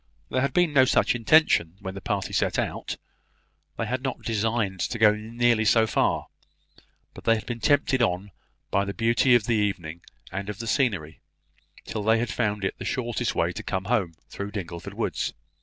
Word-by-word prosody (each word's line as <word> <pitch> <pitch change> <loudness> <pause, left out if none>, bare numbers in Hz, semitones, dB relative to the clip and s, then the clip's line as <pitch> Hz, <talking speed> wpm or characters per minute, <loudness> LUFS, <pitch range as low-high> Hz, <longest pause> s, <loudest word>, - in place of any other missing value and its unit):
There 130 - 0
had 140 - +1
been 175 -4 +2
no 135 -2 +7
such 130 - +3
intention 120 - +3
when 95 -2 -6
the 100 - -8
party - - -2
set - - +1
out; - - -3 0.8
they - - -1
had 130 +1 -2
not 135 -1 -4
designed 110 -3 -1
to 115 +8 -2
go 110 -2 +6
nearly 115 +1 +1
so 110 +1 +4
far; - - +1 0.9
but - - -12
they 115 - +5
had 110 - -5
been 120 -1 -4
tempted 130 +1 +2
on 95 -2 0 0.4
by 100 - +2
the 100 0 -5
beauty 120 +2 +4
of 115 -3 +2
the 120 - +1
evening 95 -6 -1 0.3
and 100 +2 -4
of 105 - -5
the 115 - -6
scenery, 100 - 0 0.7
till 110 - -4
they 110 +2 +3
had 120 +1 -1
found 105 -4 -1
it - - -3
the - - -5
shortest 120 -3 -2
way - - +1
to - - -5
come 95 0 -3
home 100 -8 0
through 100 - -6
the - - -15
Dingleford 85 0 -9
woods. - - -2
110 Hz, 195 wpm, -26 LUFS, 100-120 Hz, 0.9 s, no